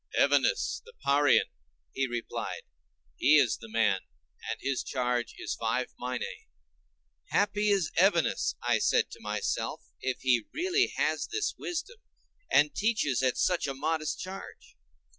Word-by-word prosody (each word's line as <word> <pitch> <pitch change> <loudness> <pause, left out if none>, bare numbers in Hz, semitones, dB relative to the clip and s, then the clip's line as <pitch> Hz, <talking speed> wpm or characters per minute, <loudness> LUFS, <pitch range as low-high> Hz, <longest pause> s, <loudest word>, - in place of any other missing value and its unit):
"Evenus - - +2
the 475 +1 -15
Parian," 140 -1 +5 0.5
he 135 0 0
replied; 120 -1 -4 0.5
"he 155 +2 +6
is 130 -6 +3
the 115 - -11
man, 110 -3 +2 0.5
and 115 - -3
his 135 -2 -1
charge 125 -2 -1
is - - -3
five 115 +3 -2
minæ." 125 0 -2 1.0
Happy 205 +1 +1
is 195 -6 +2
Evenus, 185 -4 +2
I - - +2
said - - +2
to - - -11
myself, - - -2 0.2
if 130 -1 -2
he 125 -4 +2
really 370 +4 +2
has - - 0
this 430 - -1
wisdom, 355 +7 -5 0.5
and 150 0 +4
teaches 205 - +1
at 130 -1 +1
such 180 -4 +1
a 135 - -3
modest 155 +2 -1
charge. 190 +1 -9
145 Hz, 140 wpm, -29 LUFS, 125-200 Hz, 1.0 s, he